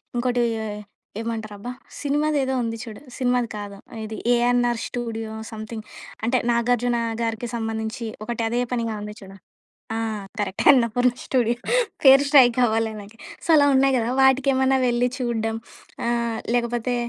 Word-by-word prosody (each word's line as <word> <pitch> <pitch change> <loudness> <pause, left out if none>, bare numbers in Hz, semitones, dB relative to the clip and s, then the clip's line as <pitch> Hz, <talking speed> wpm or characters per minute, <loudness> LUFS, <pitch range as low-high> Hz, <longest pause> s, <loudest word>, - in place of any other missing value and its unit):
ఇంకోటి 245 0 +1 0.2
ఏ - - -3 0.5
ఏమంటారబ్బా? 220 0 -5 0.3
సినిమాదేదో 290 -2 +1
ఉంది 230 -1 -3
చూడు. 220 0 -9 0.2
సినిమాది 250 -2 +1
కాదు 200 -1 -7 0.3
ఇది 220 0 -6 0.2
'ఏఎన్ఆర్ 240 -1 +2
స్టూడియో' 225 -2 -4 0.2
సమ్‌థింగ్ 220 0 -7 0.4
అంటే 245 +3 +2
'నాగార్జున' 240 0 +1 0.2
గారికి 230 +1 -2
సంబంధించి 225 0 -3 0.2
ఒకటి 235 +1 -3
అదే 240 +2 0
పనిగా 230 -2 -1
ఉంది 210 0 -6
చూడు. 195 -1 -12 0.6
ఆ! - - -1 0.4
కరెక్ట్. 200 -2 -2
'అన్నపూర్ణ 245 -1 +4
స్టూడియో'. 240 -2 +1 0.5
పేరు 270 +1 +8
స్ట్రైక్ 255 -5 +6
అవ్వలే 225 -1 +1
నాకి. 210 +3 -14 0.3
సో - - -9
అలా 285 -1 +6
ఉన్నాయి 270 0 +4
గదా! 235 0 0
వాటికేమన్నా 265 0 +4
వెళ్లి 240 +1 +2
చూడడం. 225 -2 -1 0.5
ఆహ్, 235 -1 0 0.2
లేకపోతే 240 +1 0
235 Hz, 135 wpm, -23 LUFS, 225-250 Hz, 0.6 s, పేరు